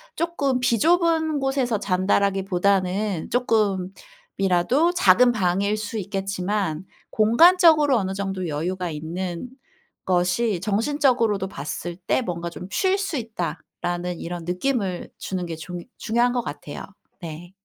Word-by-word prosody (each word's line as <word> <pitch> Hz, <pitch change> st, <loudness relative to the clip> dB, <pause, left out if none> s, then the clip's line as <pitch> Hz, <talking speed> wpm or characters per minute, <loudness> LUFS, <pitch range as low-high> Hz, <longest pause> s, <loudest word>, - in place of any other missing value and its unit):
쪼끔 285 Hz, -6 st, 0 dB
비좁은 320 Hz, -, +2 dB
곳에서 265 Hz, -5 st, 0 dB
잔다라기보다는 195 Hz, 0 st, +1 dB
쪼끔이라도 225 Hz, -, 0 dB
작은 245 Hz, -, +5 dB
방일 200 Hz, 0 st, +1 dB
수 215 Hz, +1 st, -4 dB
있겠지만 195 Hz, -3 st, -2 dB, 0.3 s
공간적으로 305 Hz, -, +5 dB
어느 190 Hz, -3 st, -1 dB
정도 190 Hz, -2 st, -3 dB
여유가 175 Hz, +4 st, -2 dB
있는 170 Hz, +7 st, -5 dB, 0.6 s
것이 180 Hz, +2 st, +1 dB
정신적으로도 225 Hz, -2 st, +1 dB
봤을 170 Hz, +4 st, -5 dB
때 190 Hz, +7 st, 0 dB
뭔가 170 Hz, -6 st, -4 dB
좀 180 Hz, +1 st, -9 dB
'쉴 380 Hz, -, +2 dB
수 390 Hz, -6 st, -2 dB
있다.'라는 175 Hz, -, -4 dB
이런 170 Hz, -1 st, -6 dB
느낌을 185 Hz, 0 st, -2 dB
주는 185 Hz, -2 st, -3 dB
게 165 Hz, -1 st, -5 dB
중 175 Hz, +2 st, -7 dB, 0.2 s
중요한 235 Hz, +2 st, +1 dB
거 245 Hz, -, 0 dB
같아요. 145 Hz, -7 st, -7 dB, 0.4 s
네. 170 Hz, +1 st, -8 dB
195 Hz, 270 characters per minute, -23 LUFS, 180-250 Hz, 0.6 s, 작은